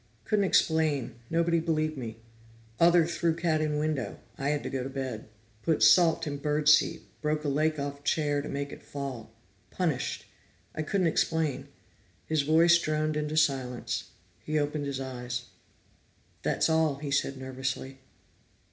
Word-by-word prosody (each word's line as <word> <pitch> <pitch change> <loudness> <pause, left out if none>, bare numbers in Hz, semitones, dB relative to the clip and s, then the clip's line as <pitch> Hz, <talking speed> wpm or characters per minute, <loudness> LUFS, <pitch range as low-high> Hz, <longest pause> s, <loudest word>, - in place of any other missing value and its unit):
Couldn't 205 -2 +2
explain, 160 -8 +2 0.2
nobody 170 0 +2
believed 155 -1 0
me. 115 -5 -6 0.6
Other 170 0 +6
threw 170 -1 0
cat 165 -2 +1
in 150 -1 0
window, 150 -4 -2 0.2
I 135 +1 -2
had 150 -1 0
to - - -3
go 135 -2 -2
to 130 - -4
bed. 130 -5 -5 0.3
Put 160 +2 +1
salt 170 -2 +5
in 145 -2 -3
bird 150 +1 -1
seed, 150 +1 +5 0.2
broke 150 0 -1
leg 155 +2 +1
of 140 0 -5
chair 145 -1 +1
to 150 - -7
make 140 0 -3
it - - -10
fall. 135 -6 -6 0.4
Punished 160 -8 -2 0.5
I - - -3
couldn't 185 +4 0
explain." 160 -3 0 0.6
His 155 -2 +1
voice 165 +4 +5
droned 155 -1 -1
into 150 0 -2
silence; 135 -5 0 0.3
he 155 0 -1
opened 145 0 -1
his 135 -1 -3
eyes. 125 -2 -5 0.9
"That - - +1
all," 160 -3 +2
he 140 0 -6
said 135 -1 0
nervously. 130 0 -4
150 Hz, 150 wpm, -29 LUFS, 135-160 Hz, 0.9 s, Other